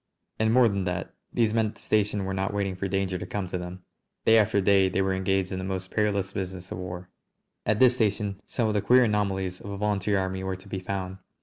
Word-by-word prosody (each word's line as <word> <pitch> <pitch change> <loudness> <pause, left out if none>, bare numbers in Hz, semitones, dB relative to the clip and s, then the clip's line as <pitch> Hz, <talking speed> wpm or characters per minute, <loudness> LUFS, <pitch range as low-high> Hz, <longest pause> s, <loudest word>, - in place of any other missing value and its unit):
And, 110 0 +3
more 125 0 +6
than 100 -3 -1
that, 90 -1 -3 0.2
these 115 -2 +2
men 110 -1 +2
at 105 - -8
the - - -19
station 105 -2 +1
were 95 - -2
not 95 +1 -1
waiting 100 -2 -1
for 95 +2 -3
danger 95 -1 -1
to 90 - -5
come 100 0 -3
to 90 0 -4
them. 90 +1 -7 0.4
Day 115 0 +7
after 105 -1 +3
day 95 -1 +4
they 95 +1 +1
were 95 0 +1
engaged 95 0 0
in 95 - -3
the - - -4
most 95 0 -4
perilous 100 -2 0
business 95 -2 -5
of - - -4
the - - -4
war. 90 0 -7 0.6
At 105 0 +3
this 125 +1 +6
station 105 -4 -1
some 115 -3 -1
of 110 - 0
the 105 - +1
queer 125 +4 +6
anomalies 95 -4 0
of 100 - -8
a 100 - -4
volunteer 105 0 +1
army 95 0 -2
were 95 0 -2
to 95 +2 -14
be 95 -1 -4
found. 95 0 -4
95 Hz, 250 wpm, -27 LUFS, 95-105 Hz, 0.6 s, Day